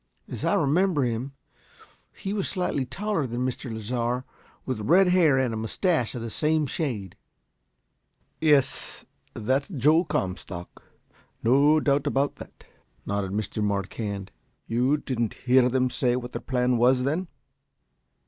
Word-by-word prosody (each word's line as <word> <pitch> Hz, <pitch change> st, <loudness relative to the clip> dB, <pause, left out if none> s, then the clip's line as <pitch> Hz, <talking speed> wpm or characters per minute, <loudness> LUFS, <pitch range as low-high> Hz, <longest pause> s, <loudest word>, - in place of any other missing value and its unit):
"As -, -, -7 dB
I -, -, +2 dB
remember 160 Hz, +1 st, +2 dB
him, 125 Hz, +3 st, -2 dB, 0.8 s
he 195 Hz, -, -5 dB
was 200 Hz, -3 st, -1 dB
slightly 160 Hz, -8 st, -1 dB
taller 190 Hz, 0 st, -2 dB
than 120 Hz, +1 st, -2 dB
Mr. 130 Hz, -1 st, -4 dB
Lasar, 120 Hz, +3 st, -2 dB, 0.4 s
with 130 Hz, -4 st, -3 dB
red 180 Hz, -, +4 dB
hair 170 Hz, -7 st, +4 dB
and 130 Hz, -3 st, +1 dB
a -, -, -3 dB
moustache 125 Hz, -, 0 dB
of 120 Hz, -, -4 dB
the 115 Hz, -, -5 dB
same 155 Hz, +3 st, +1 dB
shade." 120 Hz, -, -3 dB, 1.2 s
"Yes, 150 Hz, -4 st, +1 dB, 0.3 s
that's 130 Hz, +6 st, 0 dB
Joe 155 Hz, -, +3 dB
Comstock. 90 Hz, -, -4 dB, 0.6 s
No 140 Hz, +6 st, +5 dB
doubt 145 Hz, -1 st, +1 dB
about 140 Hz, 0 st, 0 dB
that," -, -, -12 dB, 0.4 s
nodded 100 Hz, -1 st, -2 dB
Mr. 105 Hz, +1 st, -2 dB
Marquand. 100 Hz, 0 st, -3 dB, 0.3 s
"You 125 Hz, +6 st, +1 dB
didn't 120 Hz, -6 st, -2 dB
hear 125 Hz, 0 st, +5 dB
them 130 Hz, 0 st, +1 dB
say 125 Hz, -1 st, +1 dB
what 125 Hz, 0 st, -4 dB
their -, -, -5 dB
plan 125 Hz, -1 st, +1 dB
was, 125 Hz, +2 st, +4 dB
then?" 160 Hz, +7 st, -1 dB
130 Hz, 140 wpm, -26 LUFS, 115-150 Hz, 1.2 s, No